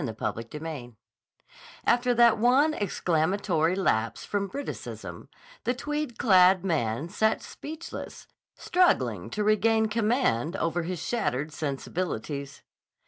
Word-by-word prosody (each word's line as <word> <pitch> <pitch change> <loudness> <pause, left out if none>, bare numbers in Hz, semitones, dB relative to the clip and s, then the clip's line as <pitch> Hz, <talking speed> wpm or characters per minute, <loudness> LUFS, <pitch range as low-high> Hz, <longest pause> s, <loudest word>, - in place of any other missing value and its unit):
CHAPTER 115 +1 -4
XII 150 -6 -7 0.9
AFTER 245 +1 +3
that 235 -2 +5
one 265 +7 +4
exclamatory 175 - 0
lapse 115 - 0
from 200 -1 -2
Briticism, 280 +9 -7 0.4
the 245 - 0
tweed 295 -2 -3
clad 185 -3 +5
man 145 - 0
sat 220 +4 +1
speechless, 315 +3 -8 0.3
struggling 365 0 +1
to 210 - -2
regain 220 +1 +3
command 215 - +1
over 170 -2 -1
his 175 +2 -4
shattered 155 - -2
sensibilities. 145 -2 -4
190 Hz, 105 wpm, -27 LUFS, 155-230 Hz, 0.9 s, that